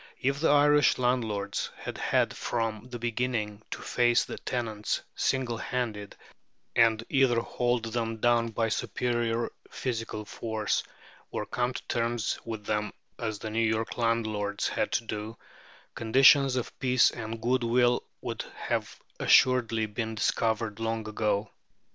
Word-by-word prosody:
If 135 +2 0
the 160 - +3
Irish 145 0 +5
landlords 110 -5 0
had - - -6
had - - +1
from 115 0 -2
the 125 - -5
beginning 115 -3 -2
to - - -6
face 120 -1 +3
the - - -7
tenants 110 -5 -2
single 130 -3 0
handed 110 -6 -3 0.6
and 115 -1 +4
either 130 -4 +3
hold 120 0 -1
them 115 0 -2
down 120 0 +3
by 115 0 0
superior 120 +1 -1 0.2
physical 115 -4 -4
force, 110 0 -1 0.5
or - - -3
come 125 +1 -1
to - - -5
terms 115 -1 -1
with 110 -2 -6
them 105 -1 -1 0.3
as 110 -3 -2
the 110 +1 -6
New 110 - 0
York 110 0 0
landlords 110 -3 0
had - - -1
to - - +1
do, 110 0 -5 0.6
conditions 135 +3 +5
of 125 - -4
peace 130 -1 +4
and 115 -1 -6
good 125 +2 +1
will 120 +1 +3 0.2
would - - -4
have - - -3 0.2
assuredly 115 -3 +4
been 110 +1 -4
discovered 110 0 0
long 115 -1 -2
ago. 105 -1 -1
115 Hz, 140 wpm, -28 LUFS, 110-125 Hz, 0.6 s, Irish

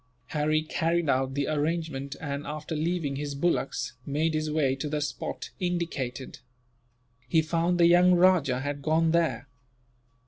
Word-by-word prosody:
Harry 155 0 +1
carried 165 +1 0
out 135 0 +1
the 140 0 0
arrangement 150 -2 -2
and, 145 -1 -4
after 155 +2 -5
leaving 155 -3 -1
his 145 0 -4
bullocks, 140 -5 -1
made 155 +4 0
his 155 0 -1
way 145 -4 +1
to 140 +3 -4
the 150 0 -1
spot 145 0 -4
indicated. 160 -9 -3 0.9
He 160 +4 +3
found 170 +2 +1
the 170 - +6
young 175 +1 +6
rajah 175 -8 +4
had 145 +1 -4
gone 160 +2 +2
there. 165 -3 +1
155 Hz, 145 wpm, -27 LUFS, 140-170 Hz, 0.9 s, the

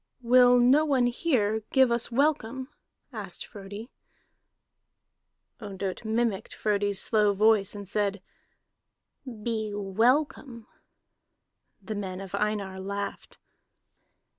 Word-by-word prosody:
"Will 245 +1 +6
no 255 +5 +5
one 270 -5 +2
here 240 -5 0
give 265 -3 +4
us 235 0 -1
welcome?" 265 -1 0 0.4
asked - - -6
Frodi. 205 +2 -10 1.7
Ondott 195 -2 -5
mimicked 220 -2 -1
Frodi's 205 -2 0
slow 210 -2 +2
voice, 210 0 +3
and 200 -1 -7
said: 200 0 -1 1.2
"Be 220 -2 -2
welcome." 235 +4 0 1.2
The 215 - -5
men 190 -3 -5
of 195 -1 -9
Einar 200 -2 -2
laughed. 200 +1 -5
215 Hz, 95 wpm, -27 LUFS, 200-245 Hz, 1.7 s, Will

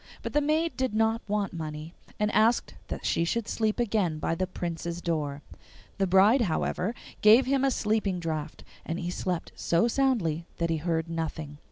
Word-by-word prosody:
But - - -4
the 295 - +3
maid 310 +3 +1
did 260 -5 -1
not 225 +1 +2
want 205 -1 -1
money, 155 0 -6 0.3
and 210 0 +1
asked 225 +3 +3
that - - -5
she 165 - +2
should 220 +6 -1
sleep 220 +1 0
again 205 -9 +1
by 155 - -1
the 185 +3 -1
Prince's 170 -1 -4
door. 150 -4 -2 0.6
The 195 - +2
bride, 200 +8 +5
however, 190 +2 -1 0.3
gave 220 +5 +7
him 270 0 +1
a 275 - +4
sleeping 210 -6 0
draught, 155 -2 -4 0.2
and 165 - -3
he 175 -1 -3
slept 180 -1 -3
so 170 +7 +2
soundly 215 - +1
that 170 -1 0
he 165 - +1
heard 160 0 -1
nothing. 160 -3 -4
180 Hz, 180 wpm, -28 LUFS, 165-225 Hz, 0.6 s, gave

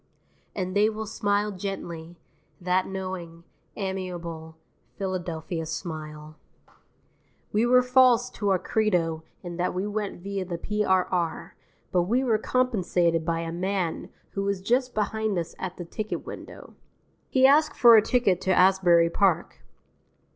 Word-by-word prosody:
And 185 -1 -3
they 210 +1 +4
will 220 0 -5
smile 205 0 0
gently, 175 -4 -6 0.4
that 180 +1 +1
knowing, 185 -3 -6 0.3
amiable 175 -5 -5 0.4
Philadelphia 175 -4 -3
smile. 155 -2 -7 1.2
We 220 +3 +3
were 250 +1 +5
false 250 -1 +4
to 205 -1 -2
our 190 - +4
credo 180 -5 0 0.2
in 175 -1 -6
that 180 0 -1
we 185 +2 -1
went 205 -3 -4
via 200 -1 -3
the 175 -2 -5
P.R.R., 185 -3 0 0.4
but 180 - +3
we 235 +9 +1
were 225 -4 +2
compensated 185 -10 +1
by 165 0 -1
a 165 0 -4
man 180 0 -2 0.2
who 195 - -3
was 200 -1 -1
just 245 +6 0
behind 215 -1 -1
us 170 -1 -3
at 185 -1 -5
the 175 - -6
ticket 215 +5 -5
window. - - -10 0.6
He 260 0 +4
asked 295 +3 +5
for 235 -2 +8
a 220 - +8
ticket 210 -6 +1
to 190 -1 +2
Asbury 180 -3 +5
Park. 185 -4 +1
190 Hz, 140 wpm, -26 LUFS, 170-210 Hz, 1.2 s, for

